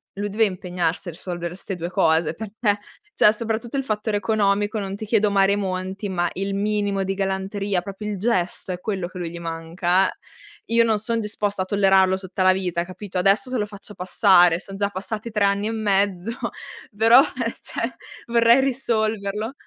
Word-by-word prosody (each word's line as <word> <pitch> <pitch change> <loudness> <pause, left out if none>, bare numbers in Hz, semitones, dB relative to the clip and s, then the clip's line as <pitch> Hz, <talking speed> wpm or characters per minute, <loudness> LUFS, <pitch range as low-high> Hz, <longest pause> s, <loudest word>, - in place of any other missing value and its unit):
lui 205 +1 -3
deve 220 +2 +2
impegnarsi 180 -2 -2
a - - -5
risolvere 175 0 -5
'ste 195 +1 -5
2 170 0 -4
cose, 160 -2 +2
perché 210 +1 -1 0.3
cioè, 210 - +6
soprattutto 225 +3 -3
il 270 - 0
fattore 210 -2 -1
economico, 205 +1 +1
non 195 0 -4
ti 215 - -6
chiedo 210 -1 +2
mare 195 0 +3
monti, 190 0 -3
ma 175 -2 0
il 195 +1 -3
minimo 205 -1 0
di 195 - -1
galanteria, 195 0 -1
proprio 200 +3 -7
il 205 - -3
gesto, 185 -3 -1
è 180 - -4
quello 190 -3 -3
che 185 +1 -11
a - - -4
lui 170 - -3
gli 170 - -8
manca, 170 +3 0
eh, - - -10 0.6
io 230 - +6
non 225 -2 +2
son 230 +2 -1
disposta 210 -2 -2
a 185 - -1
tollerarlo 190 -1 +3
tutta 190 0 -5
la 185 0 +6
vita, 180 -2 -1
capito? 185 +1 -6
Adesso 200 +8 +2
te 255 - 0
lo 210 - -1
faccio 205 0 -11
passare, 180 -2 +4
son 195 0 -9
già 200 +1 0
passati 210 +4 -5
3 210 -2 0
anni 200 +1 +2
e - - -1
mezzo, 200 -2 0 0.6
però, 225 +4 +7
eh, 250 -5 -2
cioè, 230 0 -4 0.3
vorrei 235 +1 +5
risolverlo. 220 -4 -1
200 Hz, 190 wpm, -23 LUFS, 185-215 Hz, 0.6 s, però